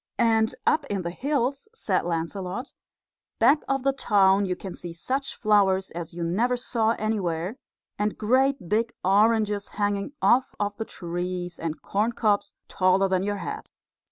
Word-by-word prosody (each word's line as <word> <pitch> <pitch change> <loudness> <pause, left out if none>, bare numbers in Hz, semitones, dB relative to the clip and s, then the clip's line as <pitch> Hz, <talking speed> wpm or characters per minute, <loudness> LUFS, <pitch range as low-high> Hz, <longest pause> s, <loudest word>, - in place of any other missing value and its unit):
"And 225 -1 +2
up 305 -1 +3
in 195 -2 -2
the 170 - -3
hills," 275 - -1
said - - 0
Lancelot, 180 +7 -3 0.6
"back 275 +7 +5
of 270 -1 0
the 275 0 +2
town, 200 -6 +3
you 180 - -1
can 190 -1 -7
see 175 -1 -8
such 270 +11 -3
flowers 195 -3 +2
as 170 -1 -6
you 170 0 -5
never 230 +9 +1
saw 230 -2 0
anywhere, 195 -2 -2 0.4
and 210 0 0
great 260 0 +2
big 230 +5 0
oranges 210 +1 +3
hanging 205 +4 -1
off 255 +2 +3
of 205 0 -1
the 225 - -3
trees, 175 -1 -5
and 160 -1 -4
corn 215 +4 0
cobs 210 -3 0
taller 185 +1 +3
than 185 -1 +1
your 205 +1 -1
head. - - -6
205 Hz, 155 wpm, -26 LUFS, 185-235 Hz, 0.6 s, back